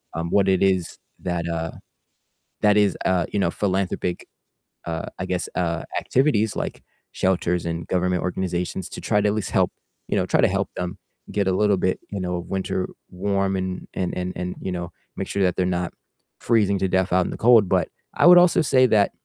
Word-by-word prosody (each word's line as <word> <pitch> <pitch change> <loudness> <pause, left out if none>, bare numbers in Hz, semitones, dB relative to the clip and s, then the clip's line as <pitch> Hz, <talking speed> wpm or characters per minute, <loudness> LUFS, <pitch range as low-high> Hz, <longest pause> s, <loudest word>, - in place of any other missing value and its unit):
um, 85 +1 -2
what 100 -1 +3
it 95 - +2
is 95 -3 +1 0.3
that, 85 -2 -2
uh, 80 -1 -2 0.9
that 105 0 +4
is, 105 -1 +3
uh, 90 -2 +2
you 100 - +1
know, 85 -3 +1
philanthropic, 95 -2 -1 0.6
uh, 80 -1 -4
I 95 - -2
guess, 90 -1 -2
uh, 85 -2 -1 0.2
activities, 125 -6 +1
like, - - -4 0.3
shelters 90 -2 0
and 85 0 -3
government 90 -1 0
organizations 90 0 -2
to - - -8
try 105 - +1
to 105 - +2
at - - 0
least 110 -3 -3
help, - - +2 0.4
you - - -1
know, - - +1
try - - +2
to - - +5
help - - -1
them 90 +2 -4 0.3
get 100 -2 0
a 95 - +3
little 105 +2 +3
bit, 95 0 0
you 100 -2 -4
know, 90 -1 -2
winter 95 -1 -2 0.2
warm 95 +1 -1
and 95 0 -4
and 90 -1 -2 0.2
and, 90 0 -4
you 95 - -3
know, 85 -1 -4 0.3
make - - -3
sure 100 - 0
that 90 -1 +2
they're 90 - +2
not 90 -1 -1 0.5
freezing 105 -4 +2
to 95 - +1
death 95 0 +1
out 90 -1 +3
in - - -4
the - - -6
cold. 115 -4 +6
But, - - +2 0.3
I - - +5
would 180 0 +10
also 175 -1 +5
say 130 -3 +4
that 105 -3 +3
95 Hz, 205 wpm, -23 LUFS, 90-100 Hz, 0.9 s, would